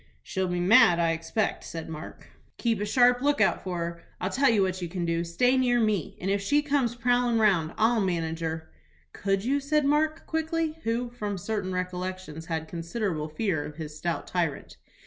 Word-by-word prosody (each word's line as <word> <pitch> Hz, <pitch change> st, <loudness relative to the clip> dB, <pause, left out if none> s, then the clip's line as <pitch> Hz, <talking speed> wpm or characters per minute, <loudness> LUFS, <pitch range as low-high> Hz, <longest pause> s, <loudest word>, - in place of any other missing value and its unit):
"She'll 190 Hz, -1 st, -2 dB
be 180 Hz, 0 st, -1 dB
mad, 180 Hz, -1 st, +6 dB
I 170 Hz, -1 st, +2 dB
expect," 165 Hz, +6 st, -1 dB
said 165 Hz, -1 st, -6 dB
Mark. 160 Hz, 0 st, -9 dB, 0.3 s
"Keep 225 Hz, -4 st, 0 dB
a -, -, 0 dB
sharp 245 Hz, +3 st, +4 dB
lookout 290 Hz, +1 st, +2 dB
for 185 Hz, -2 st, -3 dB
her. 170 Hz, 0 st, -4 dB, 0.2 s
I'll 185 Hz, -, -2 dB
tell 275 Hz, +1 st, +3 dB
you 215 Hz, -4 st, +4 dB
what 185 Hz, 0 st, -2 dB
you 175 Hz, -, -3 dB
can 175 Hz, 0 st, -3 dB
do: 170 Hz, 0 st, 0 dB
stay 245 Hz, +10 st, +2 dB
near 245 Hz, -2 st, +3 dB
me, 215 Hz, -7 st, 0 dB
and 190 Hz, +2 st, -1 dB
if 200 Hz, 0 st, +1 dB
she 290 Hz, +9 st, +2 dB
comes 275 Hz, -5 st, +1 dB
prowlin' 245 Hz, 0 st, +2 dB
round 185 Hz, -7 st, +2 dB
I'll 225 Hz, +1 st, +3 dB
manage 165 Hz, -4 st, -1 dB
her." 160 Hz, -1 st, -4 dB, 0.4 s
"Could 195 Hz, 0 st, -1 dB
you?" 275 Hz, +3 st, +2 dB
said 295 Hz, +1 st, +1 dB
Mark, 310 Hz, +2 st, +1 dB
quickly, 320 Hz, 0 st, -1 dB
who, 235 Hz, +2 st, -1 dB
from 210 Hz, -4 st, -4 dB
certain 200 Hz, 0 st, -3 dB
recollections, 180 Hz, -3 st, -4 dB
had 160 Hz, -1 st, -3 dB
considerable 170 Hz, -2 st, -3 dB
fear 155 Hz, -1 st, -1 dB
of 150 Hz, -, -8 dB
his 155 Hz, -1 st, -7 dB
stout 170 Hz, +2 st, -3 dB
tyrant. 170 Hz, -6 st, -2 dB
195 Hz, 190 wpm, -27 LUFS, 170-245 Hz, 0.4 s, mad